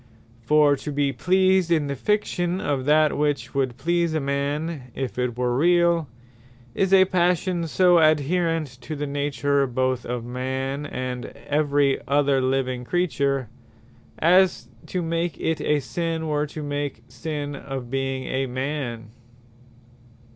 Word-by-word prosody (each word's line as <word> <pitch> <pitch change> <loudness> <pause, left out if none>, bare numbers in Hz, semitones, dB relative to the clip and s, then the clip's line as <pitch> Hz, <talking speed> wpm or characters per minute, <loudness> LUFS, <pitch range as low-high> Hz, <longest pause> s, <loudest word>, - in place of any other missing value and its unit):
For 150 +3 +4
to 150 - -6
be 140 -1 0
pleased 185 +6 +2
in 155 -3 +3
the 140 0 -3
fiction 180 +1 0
of 135 -6 -1
that, 155 +1 +4
which 145 -1 -1
would 130 -3 -1
please 170 -1 0
a - - +2
man 140 0 -2
if 130 -2 -4
it 125 -1 -1
were 125 -1 0
reall, 170 +1 +3 0.7
is 190 -1 0
a 190 -1 +7
Passion 180 -1 +1
so 180 +2 +4
adhaerent 155 -2 +1
to 155 - -6
the 145 0 -3
Nature 140 -1 0
both 130 0 -1
of 120 -1 -4
a - - -9
man, 130 +3 -3
and 125 -1 -4 0.2
every 145 -2 +2
other 140 -1 +2
living 130 -1 -1
creature, 140 -5 0 0.7
as 180 +3 +3 0.2
to 180 -1 -2
make 165 +1 -2
it 160 -1 -1
a 150 0 +2
Sinne, 165 +2 -3
were 150 0 0
to 150 +1 -7
make 145 -5 -4
Sinne 145 +3 -5
of 135 -3 -6
being 135 -1 -2
a 135 +1 -2
man. 130 -3 -4
145 Hz, 145 wpm, -24 LUFS, 130-165 Hz, 0.7 s, a